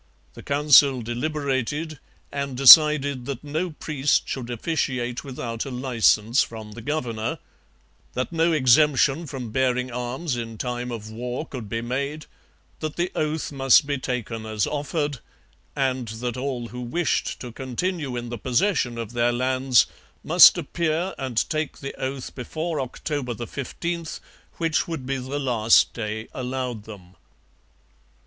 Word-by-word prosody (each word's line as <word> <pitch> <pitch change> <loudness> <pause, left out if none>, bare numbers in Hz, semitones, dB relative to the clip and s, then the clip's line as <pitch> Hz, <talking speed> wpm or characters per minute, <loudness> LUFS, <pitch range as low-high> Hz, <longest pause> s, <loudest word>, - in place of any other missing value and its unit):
The - - -11
Council 140 -3 +5
deliberated 145 +4 -2 0.3
and 140 -2 -4
decided 140 -1 +8
that 140 -2 -5
no 155 +5 -2
priest 150 -3 0
should 125 -3 -4
officiate 125 -2 -2
without 120 -4 -5
a - - -6
licence 125 -2 +2
from 110 -2 -5
the 115 +2 -9
governor; 120 -5 -2 0.8
that 130 +5 -2
no 165 0 +2
exemption 150 +2 +4
from 130 -5 -6
bearing 125 0 0
arms 125 +5 -3
in 115 -2 -5
time 125 +1 -3
of 110 -2 -7
war 125 +6 -4
could 120 -9 -8
be 115 +1 -2
made; 140 +5 -3 0.5
that 155 -1 -4
the 175 +1 -1
oath 155 0 -2
must 135 +1 +5
be 140 -1 -2
taken 120 -3 -4
as 110 -2 -1
offered; 145 -1 -2 0.6
and 130 -3 0
that 115 +2 -4
all 125 -3 -4
who 125 +1 -7
wished 145 +7 -1
to 125 - -7
continue 135 +3 -3
in 120 0 -5
the 120 -2 -5
possession 125 - +1
of 115 0 -5
their 120 0 +2
lands 130 0 +3 0.4
must - - +8
appear 170 +2 -1
and 130 -4 -1
take 155 -1 -2
the 140 - -6
oath 130 0 -4
before 155 +4 -3
October 130 -1 -4
15, 170 +7 -4 0.5
which 165 -2 0
would 160 -6 -5
be 135 +1 -1
the 130 +2 -4
last 120 -5 +3
day 110 -1 -4
allowed 125 -4 -4
them. 95 -4 -12
130 Hz, 140 wpm, -24 LUFS, 120-150 Hz, 0.8 s, decided